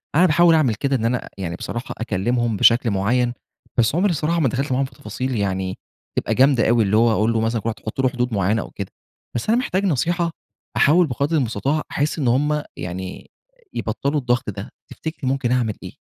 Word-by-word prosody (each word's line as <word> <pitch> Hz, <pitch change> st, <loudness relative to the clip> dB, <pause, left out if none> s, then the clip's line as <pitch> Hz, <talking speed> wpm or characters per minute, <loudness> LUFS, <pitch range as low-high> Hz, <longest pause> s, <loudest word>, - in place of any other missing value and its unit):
أنا 175 Hz, +4 st, +6 dB
باحاول 170 Hz, 0 st, +5 dB
أعمل 130 Hz, -8 st, +3 dB
كده، 135 Hz, +5 st, 0 dB
إن 115 Hz, -2 st, -1 dB
أنا 125 Hz, +1 st, -1 dB
يعني 85 Hz, -3 st, -4 dB
بصراحة 120 Hz, +6 st, -5 dB
أكلمهم 115 Hz, +1 st, 0 dB
بشكل 115 Hz, +1 st, +4 dB
معين، 120 Hz, +5 st, +1 dB, 0.4 s
بس 120 Hz, +5 st, +3 dB
عمري 190 Hz, +2 st, +3 dB
الصراحة 165 Hz, +2 st, 0 dB
ما 140 Hz, -6 st, +3 dB
دخلت 135 Hz, +2 st, -2 dB
معاهم 135 Hz, +2 st, +2 dB
في -, -, -10 dB
تفاصيل 130 Hz, -3 st, -4 dB
يعني 95 Hz, -2 st, -1 dB, 0.4 s
تبقي -, -, 0 dB
جامدة 130 Hz, -3 st, +4 dB
أوي، 115 Hz, -2 st, +4 dB
اللي 105 Hz, +2 st, +2 dB
هو 115 Hz, 0 st, +5 dB
أقول 110 Hz, +1 st, +2 dB
له 110 Hz, -, +1 dB
مثلًا 115 Hz, 0 st, 0 dB
كل 115 Hz, -, -2 dB
واحد 110 Hz, -, -4 dB
تحط 110 Hz, +4 st, -3 dB
له 130 Hz, -, +3 dB
حدود 125 Hz, -2 st, -2 dB
معينة 100 Hz, +3 st, +1 dB
أو -, -, -9 dB
كده. 100 Hz, -2 st, -6 dB, 0.4 s
بس 120 Hz, -, -2 dB
أنا 235 Hz, -, +4 dB
محتاج 200 Hz, -6 st, -1 dB
نصيحة 170 Hz, +2 st, +1 dB, 0.5 s
أحاول 165 Hz, +3 st, +5 dB
بقدر 140 Hz, +5 st, 0 dB
المستطاع 135 Hz, +4 st, 0 dB
أحِس 150 Hz, +2 st, -1 dB
إن 135 Hz, -, 0 dB
هُم 150 Hz, +5 st, +2 dB
يعني 90 Hz, +1 st, -6 dB, 0.4 s
يبطلوا 140 Hz, +7 st, -1 dB
الضغط 120 Hz, -3 st, 0 dB
ده، 100 Hz, +1 st, -6 dB, 0.2 s
تفتكري 155 Hz, -4 st, -4 dB
ممكن 135 Hz, -2 st, 0 dB
أعمل 120 Hz, -4 st, +1 dB
إيه؟ -, -, -8 dB
125 Hz, 200 wpm, -21 LUFS, 110-145 Hz, 0.5 s, أنا